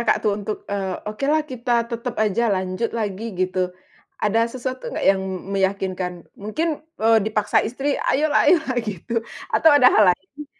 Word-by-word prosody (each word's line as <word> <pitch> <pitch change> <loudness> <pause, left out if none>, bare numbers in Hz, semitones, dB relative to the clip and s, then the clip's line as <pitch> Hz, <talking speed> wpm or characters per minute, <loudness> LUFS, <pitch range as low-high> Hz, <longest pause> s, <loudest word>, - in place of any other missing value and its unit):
Kakak, 235 - +3
tuh 210 - +3
untuk, 210 +1 -3 0.2
eee, 190 -2 -2
okelah 280 +9 +1
kita 245 -1 -2 0.2
tetap 235 +1 -4
aja 215 +3 0
lanjut 185 +4 -2
lagi 210 -1 -3 0.2
gitu. 185 0 0 0.6
Ada 225 +2 +2
sesuatu 255 0 -5
nggak - - -3
yang 195 -1 0 0.3
meyakinkan 190 -2 -1 0.3
mungkin, 300 +10 -2 0.2
eee, 225 0 +6
dipaksa 215 -1 +1
istri, 270 +5 -2
ayolah 295 +3 +3
ayolah 320 -7 +3
gitu, 210 0 -6 0.4
atau 320 - +5
ada 255 -3 +7
hal 215 - +6
lain? 275 +12 -13
220 Hz, 155 wpm, -22 LUFS, 195-255 Hz, 0.6 s, ada